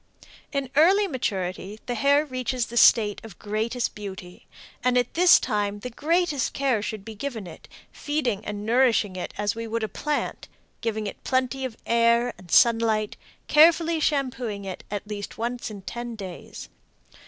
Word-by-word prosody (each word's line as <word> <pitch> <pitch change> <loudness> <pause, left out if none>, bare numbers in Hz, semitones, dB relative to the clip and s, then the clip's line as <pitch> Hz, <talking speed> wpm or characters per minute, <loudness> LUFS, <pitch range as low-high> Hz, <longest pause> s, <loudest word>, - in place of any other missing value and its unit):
In 275 -3 -3
early 380 +7 +5
maturity 200 - -3
the 245 - -2
hair 280 +5 +3
reaches 255 -2 -2
the 235 - -10
state 215 -3 +5
of 220 -6 -11
greatest 220 +3 -2
beauty, 190 -3 -9 0.4
and 250 0 +3
at 245 -1 0
this 355 +1 +7
time 205 -3 -2
the 250 - -6
greatest 310 0 0
care 265 -6 +1
should 210 -1 -5
be 225 - -7
given 225 -2 -5
it, 170 - -12 0.2
feeding 260 -9 -2
and 210 0 -5
nourishing 230 -4 +3
it 180 - -5
as 205 0 0
we 230 0 -5
would 230 0 -2
a - - 0
plant 300 +6 -3 0.3
giving 220 -2 -2
it 205 - -7
plenty 260 0 0
of 240 -4 -6
air 235 +1 +3
and 180 -2 -15
sunlight, 225 -1 +3 0.3
carefully 325 +1 +5
shampooing 255 -9 -1
at 190 -1 -6 0.2
least 205 -1 -6
once 240 +1 -3
in 205 -3 -9
ten 240 +2 -6
days. 190 -5 -8
235 Hz, 160 wpm, -25 LUFS, 210-265 Hz, 0.4 s, this